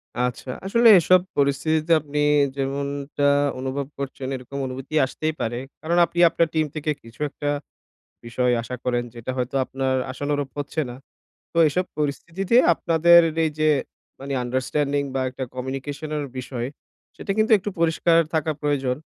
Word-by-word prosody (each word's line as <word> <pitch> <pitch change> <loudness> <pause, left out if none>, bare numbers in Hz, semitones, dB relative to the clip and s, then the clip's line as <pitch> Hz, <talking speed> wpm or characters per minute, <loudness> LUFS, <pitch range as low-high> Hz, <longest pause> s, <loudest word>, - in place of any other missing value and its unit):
আচ্ছা। 125 +1 -2 0.2
আসলে 235 +5 +4
এসব 185 +2 +5 0.2
পরিস্থিতিতে 155 +3 +1
আপনি 150 0 -4 0.4
যেমনটা 140 +1 -2 0.3
অনুভব 135 +1 -3
করছেন 135 -1 -5
এরকম 130 +2 -8
অনুভূতি 135 +3 -6
আসতেই 155 +4 -3
পারে। 120 +1 -2 0.2
কারণ 170 +2 0
আপনি 175 - -5
আপনার 165 0 +1
টিম 160 -1 +2
থেকে 155 0 -1
কিছু 115 0 -16
একটা 145 +1 -4 0.8
বিষয় 125 +1 0
আশা 125 +2 -6
করেন 120 -1 +1
যেটা 120 +1 -5
হয়তো 125 0 -3
আপনার 130 0 -2 0.2
আশানুরূপ 145 +1 -2
হচ্ছে 145 +2 -2
না। 120 - -8 0.6
তো 170 - -1
এসব 180 +5 0
পরিস্থিতিতে 170 +8 -1 0.2
আপনাদের 170 +1 +5 0.2
এই 160 - +1
যে 155 0 +3 0.5
মানে 140 +1 -5
আন্ডারস্ট্যান্ডিং 140 +3 -1
বা 135 - 0
একটা 130 +1 -5
কমিউনিকেশনের 145 +4 -4
বিষয় 125 -1 -4 0.5
সেটা 195 - -3
কিন্তু 220 +1 +3
একটু 200 +2 -4
পরিষ্কার 165 0 +3 0.2
থাকা 160 0 +1
প্রয়োজন। 135 -4 0
140 Hz, 145 wpm, -23 LUFS, 130-160 Hz, 0.8 s, এসব